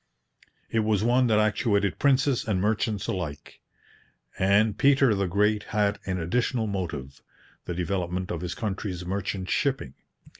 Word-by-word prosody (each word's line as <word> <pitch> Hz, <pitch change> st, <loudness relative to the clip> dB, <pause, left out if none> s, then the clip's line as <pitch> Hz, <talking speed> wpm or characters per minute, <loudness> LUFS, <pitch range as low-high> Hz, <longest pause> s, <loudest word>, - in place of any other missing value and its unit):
It 115 Hz, -, +1 dB
was 110 Hz, -2 st, +1 dB
one 125 Hz, +2 st, +3 dB
that 110 Hz, -2 st, +3 dB
actuated 105 Hz, -1 st, +1 dB
princes 135 Hz, -3 st, +2 dB
and 100 Hz, -4 st, +1 dB
merchants 105 Hz, 0 st, 0 dB
alike. 80 Hz, -6 st, -5 dB, 0.8 s
And 100 Hz, +3 st, +3 dB
Peter 135 Hz, -4 st, +4 dB
the 100 Hz, -2 st, 0 dB
Great 105 Hz, +3 st, +2 dB
had 105 Hz, -1 st, 0 dB
an 95 Hz, -1 st, -1 dB
additional 115 Hz, +7 st, 0 dB
motive 80 Hz, -10 st, -5 dB, 0.4 s
the 85 Hz, -, -4 dB
development 90 Hz, 0 st, -2 dB
of 85 Hz, -, -3 dB
his 90 Hz, -1 st, -4 dB
country's 95 Hz, -4 st, -4 dB
merchant 95 Hz, 0 st, -3 dB
shipping. 135 Hz, -, 0 dB
100 Hz, 140 wpm, -26 LUFS, 90-110 Hz, 0.8 s, Peter